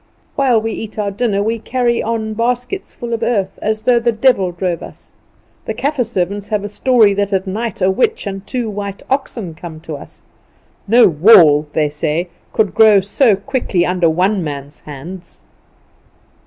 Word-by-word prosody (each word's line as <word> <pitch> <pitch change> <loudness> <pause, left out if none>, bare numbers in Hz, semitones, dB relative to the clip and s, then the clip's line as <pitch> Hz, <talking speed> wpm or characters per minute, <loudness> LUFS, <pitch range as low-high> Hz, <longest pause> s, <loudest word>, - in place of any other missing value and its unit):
While 255 -5 +3
we 225 +1 -3
eat 220 0 -7
our 205 -1 -1
dinner 205 -1 0
we 225 +2 -1
carry 240 0 0
on 220 -1 -2
baskets 245 - -2
full 235 -1 -6
of 230 - -2
earth, 200 -6 -1
as 215 0 -2
though 245 -1 +4
the 235 0 +1
devil 220 -5 +2
drove 175 -1 -3
us. - - -13 0.5
The - - -4
Kaffer 285 -2 0
servants 200 -2 -3
have 210 -2 -1
a - - -3
story 220 -1 +3
that 200 0 -1
at 190 0 0
night 210 +1 -3
a 190 - +4
witch 440 - 0
and 195 -1 -5
two 245 -3 -2
white 200 -2 -6
oxen 235 - -2
come 160 -1 -9
to 160 - -10
help - - -12
us. - - -20 0.6
No 235 +4 +6
wall, 155 -3 +6
they 150 -2 +1
say, 155 +4 -2 0.2
could 215 -3 0
grow 215 -2 +6
so 205 +3 +2
quickly 200 -5 -1
under 180 -2 +1
one 185 +4 +1
man's 145 -1 -7
hands. 165 +6 -10
205 Hz, 180 wpm, -16 LUFS, 180-235 Hz, 0.6 s, No